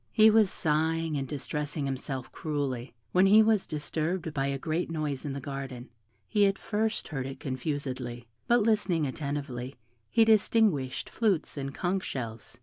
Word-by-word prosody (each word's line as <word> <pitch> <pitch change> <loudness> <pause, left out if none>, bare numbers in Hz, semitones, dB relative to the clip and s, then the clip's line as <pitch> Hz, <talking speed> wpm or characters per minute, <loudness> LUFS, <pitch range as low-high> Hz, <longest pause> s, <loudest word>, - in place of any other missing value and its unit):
He 220 -1 +7
was 215 -2 +5
sighing 160 0 0
and 135 -2 -2
distressing 145 +1 -3
himself 135 -1 -4
cruelly, 140 -6 -3 0.2
when 185 +2 +5
he 215 +3 +8
was 215 -2 +2
disturbed 160 +2 -2
by 135 -1 0
a 140 0 -1
great 160 +5 -2
noise 155 -4 -3
in 140 - -2
the 140 - -4
garden; 135 -2 -6 0.4
he 205 -2 +4
at 195 0 0
first 220 +1 -1
heard 135 -4 -3
it 135 0 -7
confusedly, 130 -3 -4 0.2
but 240 -2 +4
listening 205 -8 +2
attentively, 140 -2 -4 0.3
he 225 - +5
distinguished 210 - +3
flutes 205 -8 0
and 135 -1 -4
conch 185 +1 0
shells. 115 -4 -6
150 Hz, 155 wpm, -29 LUFS, 135-190 Hz, 0.4 s, he